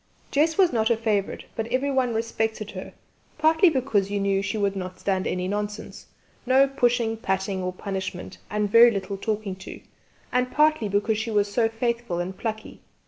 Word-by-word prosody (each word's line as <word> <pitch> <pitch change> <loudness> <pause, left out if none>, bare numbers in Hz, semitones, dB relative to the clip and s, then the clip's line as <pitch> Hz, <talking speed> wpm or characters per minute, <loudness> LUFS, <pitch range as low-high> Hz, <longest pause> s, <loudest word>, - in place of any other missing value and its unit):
Jess 315 +3 +2
was 370 -6 +4
not 220 -1 +2
a 235 - +3
favourite, 215 -3 -1
but 225 0 -3
everyone 260 -2 0
respected 220 -1 -2
her, 185 -1 -8 0.4
partly 320 +4 +5
because 245 -9 0
you 205 0 -1
knew 195 0 +1
she 195 +3 -3
would 200 -1 0
not 185 -1 -6
stand 190 -2 -1
any 180 0 -2
nonsense 210 +2 -5 0.4
no 265 +2 +4
pushing, 245 -4 +1
patting 190 -2 -2
or 180 0 -2
punishment, 190 -1 -5
and 210 +1 0
very 235 +2 +8
little 200 -2 -3
talking 205 -1 -3
to 190 - -9 0.5
and 250 0 +1
partly 300 -7 +3
because 205 +2 +1
she 225 +1 -3
was 205 -2 +1
so 225 -1 +2
faithful 235 -5 -2
and 180 +2 -3
plucky. 220 -1 -5
220 Hz, 175 wpm, -25 LUFS, 195-240 Hz, 0.5 s, very